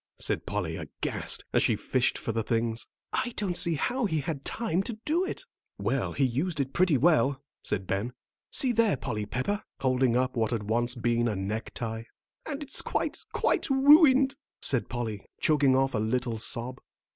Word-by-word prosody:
said - - -1
Polly, - - -2
aghast, - - -3
as - - +4
they - - +2
fished - - 0
for - - -3
the 115 0 -1
things. 115 +1 -1 0.3
"I 240 - -1
don't 190 -4 -1
see 170 -1 +2
how 245 - 0
he 160 -7 0
had 140 -1 -4
time 215 -3 -1
to 215 +2 -5
do 335 +4 +2
it." 380 - -5 0.3
"Well, - - -1
he 140 - 0
used 150 +7 -1
it 135 -1 -2
pretty 175 -5 +3
well," 140 -2 +3 0.2
said 95 -2 -2
Ben. 100 +6 -2 0.4
"See 260 - +4
there, 225 - +2
Polly 105 -3 -4
Pepper," 130 - -2 0.2
holding 130 -2 +2
up 130 +1 0
what 110 -2 +1
had 115 -3 -2
once 120 +4 0
been 120 0 +1
a 110 - -1
necktie. 110 +3 -4 0.4
"And 295 -1 -4
it's 280 - +1
quite, - - -2
quite - - 0
ruined," 275 0 +6 0.3
said 130 -4 +2
Polly, 115 -5 -4 0.2
choking 145 -4 +4
off 135 0 +2
a - - 0
little 115 +1 -1
sob. 120 +3 -1
130 Hz, 180 wpm, -28 LUFS, 115-190 Hz, 0.4 s, ruined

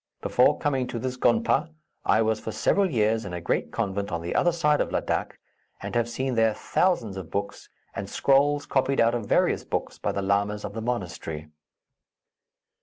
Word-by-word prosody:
Before - - +4
coming 135 -3 0
to 120 - -5
this 130 +2 -3
gonpa, 170 - +2 0.4
I 110 +3 +4
was 110 0 0
for 110 - -5
several 195 - +2
years 110 -4 +1
in 90 - -7
a 90 - -3
great 85 - -1
convent 100 +1 -2
on 85 0 -3
the 85 - -3
other 175 - +3
side 150 -3 +2
of - - -1
Ladak, - - -2 0.4
and - - -6
have 120 0 +1
seen 130 +2 -2
there 115 -2 +2
thousands 115 - 0
of 95 -4 -7
books, 100 0 -4 0.2
and 100 0 -5
scrolls 145 +3 +2
copied 135 0 +1
out 115 0 +4
of 115 -4 -3
various - - +2
books - - -4
by - - -1
the 100 - -3
lamas 100 +1 0
of 100 - -6
the 110 - -4
monastery." 85 -9 -4
115 Hz, 185 wpm, -26 LUFS, 100-135 Hz, 0.4 s, Before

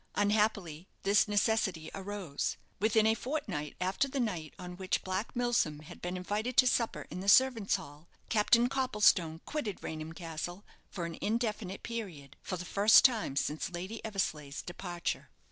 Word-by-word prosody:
Unhappily 205 -5 +1 0.2
this 200 +1 +4
necessity 205 -5 +1
arose. 195 -6 -3 0.2
Within 220 +1 +3
a 220 - +5
fortnight 220 - -3
after 185 +9 +1
the 275 0 -3
night 180 - -2
on 180 0 -7
which 185 0 -1
Black 190 +6 -3
Milsom 240 -12 +1
had 165 +3 -12
been 180 +1 -3
invited 210 +7 -2
to - - +8
supper 240 -2 +1
in - - -5
the 195 +2 0
servants' 235 -3 +5
hall, 155 -3 -9 0.2
Captain 235 +3 +4
Copplestone 210 -11 +2
quitted 260 -11 -4
Raynham 155 0 -5
Castle 170 +3 -6 0.2
for 175 -4 -4
an 165 -1 -6
indefinite 215 -3 -2
period, 180 - -6
for 185 - -4
the 180 - -6
first 200 +4 +6
time 225 - +2
since 150 +2 -1
Lady 185 +5 -6
Eversleigh's 155 -9 -3
departure. 175 -1 -4
195 Hz, 155 wpm, -32 LUFS, 170-220 Hz, 0.2 s, to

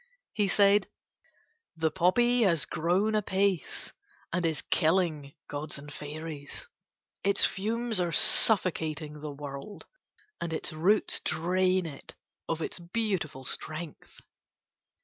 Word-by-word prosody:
He 205 -2 +1
said: 200 +1 +4 0.9
"The 160 -1 +1
poppy 240 +8 +3
has 170 -8 +3
grown 180 +7 +1
apace 195 -3 0 0.4
and 175 -1 +1
is 160 -2 -2
killing 155 -4 +1
gods 145 +1 -5
and 145 +1 -10
fairies. 150 -1 -7 0.6
Its 200 0 +4
fumes 225 +2 -1
are 175 -1 0
suffocating 160 -8 +3
the 150 - -5
world, 140 +6 -8 0.6
and 170 -1 -3
its 160 - -2
roots 185 +7 +2
drain 185 +2 +1
it 145 -4 -9 0.3
of 165 0 -1
its - - -4
beautiful 175 -7 -2
strength." 155 +3 -6
170 Hz, 110 wpm, -29 LUFS, 155-195 Hz, 0.9 s, said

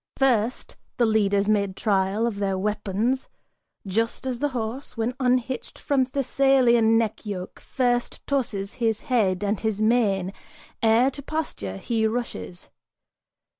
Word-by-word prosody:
First 250 -3 +1 0.2
the 240 - +4
leaders 205 -2 +2
made 200 -3 +1
trial 200 +1 +1
of 220 -4 -2
their 195 -2 0
weapons 210 +5 -1 0.6
Just 225 +6 -1
as 255 -2 -2
the 290 - +1
horse, 250 +1 -5
when 230 +2 0
unhitched 255 0 0
from 270 -2 +1
Thessalian 255 -4 +3
neck 225 -2 -1
yoke, 195 -4 -6
First 245 -2 -1
tosses 225 -8 -1
his 225 -2 +1
head 210 -9 +1
and 205 0 0
his 220 -2 -1
mane, 210 -4 +2 0.5
ere 230 +4 +4
to 280 - -9
pasture 265 - -4
he 220 - 0
rushes. 95 - -5
225 Hz, 130 wpm, -25 LUFS, 200-250 Hz, 0.6 s, the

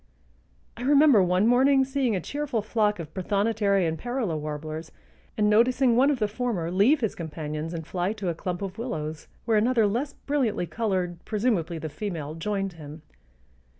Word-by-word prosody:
I - - -8
remember 280 -3 +6
one 180 +2 +2
morning 265 +3 +4
seeing 265 -4 0
a - - 0
cheerful 275 - -3
flock 215 -1 +1
of 160 -3 -8
prothonotary 200 0 +1
and 160 0 -3
parula 240 -8 -2
warblers 155 +1 -5 0.5
and 210 -1 +3
noticing 240 +3 +4
one 265 +4 +5
of 290 - +1
the 215 -3 +1
former 205 -7 -2
leave 230 - +4
his 220 - 0
companions 155 -1 -5
and 165 -2 -5
fly 180 +3 -1
to 200 -4 -3
a - - 0
clump 180 +2 -4
of 195 +2 -6
willows 155 -10 -4 0.2
where 225 -2 +3
another 230 +1 +3
less 245 +8 -1
brilliantly 260 -10 -1
colored, 185 -5 -2
presumably 205 -7 -1
the 160 - -5
female, 155 -2 -5
joined 195 +3 -2
him. 155 -1 -11
205 Hz, 170 wpm, -26 LUFS, 165-240 Hz, 0.5 s, remember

